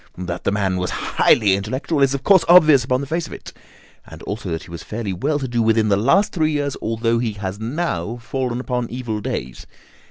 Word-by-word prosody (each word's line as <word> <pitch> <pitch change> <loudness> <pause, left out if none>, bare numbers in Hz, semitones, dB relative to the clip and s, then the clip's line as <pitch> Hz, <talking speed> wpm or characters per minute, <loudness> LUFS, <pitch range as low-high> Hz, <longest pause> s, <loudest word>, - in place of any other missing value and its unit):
That 90 -1 -5
the - - +2
man 100 -2 0
was 90 0 -2
highly 105 -4 +2
intellectual 130 - -2
is 135 0 +3
of 135 - -5
course 195 -3 +5
obvious 155 -7 +7
upon 125 +1 0
the - - -4
face 165 +3 -2
of - - -10
it, - - -10 0.5
and - - -13
also 105 -2 -5
that 80 -1 -3
he 85 - -14
was 85 -1 -7
fairly 105 -3 -4
well 145 - -1
to 135 -2 -3
do 120 -1 -1
within 110 -1 +2
the 100 - +4
last 170 - +3
three 155 -3 +1
years, 145 -2 -1
although 115 +1 0
he 115 -3 -2
has 100 -1 -5
now 120 - -3
fallen 125 0 -3
upon 125 -2 -3
evil 115 -3 -4
days. 65 -9 -5
120 Hz, 220 wpm, -20 LUFS, 105-140 Hz, 0.5 s, obvious